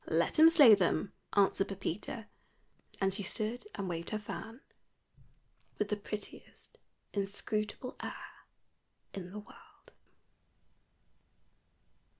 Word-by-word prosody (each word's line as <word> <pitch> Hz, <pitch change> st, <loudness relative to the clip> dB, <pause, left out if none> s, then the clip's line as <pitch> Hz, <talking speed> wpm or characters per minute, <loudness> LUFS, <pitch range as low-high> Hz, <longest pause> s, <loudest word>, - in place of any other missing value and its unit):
"Let -, -, +2 dB
him 320 Hz, +1 st, +10 dB
slay 290 Hz, -9 st, +9 dB
them," 190 Hz, -1 st, +2 dB, 0.2 s
answered 195 Hz, -1 st, +3 dB
Pepita. 195 Hz, +3 st, -4 dB, 0.7 s
And 195 Hz, -1 st, +2 dB
she 205 Hz, -, -2 dB
stood 215 Hz, -, -3 dB
and 195 Hz, -, -3 dB
waved 170 Hz, -1 st, -3 dB
her 215 Hz, -, -1 dB
fan 225 Hz, +3 st, -7 dB, 1.2 s
with 210 Hz, -, -1 dB
the 210 Hz, -, +1 dB
prettiest 210 Hz, 0 st, -8 dB, 0.3 s
inscrutable 210 Hz, +4 st, -2 dB
air -, -, -8 dB, 0.7 s
in 185 Hz, -2 st, -6 dB
the 200 Hz, -, -8 dB
world. 210 Hz, -, -14 dB
205 Hz, 105 wpm, -33 LUFS, 195-215 Hz, 1.2 s, him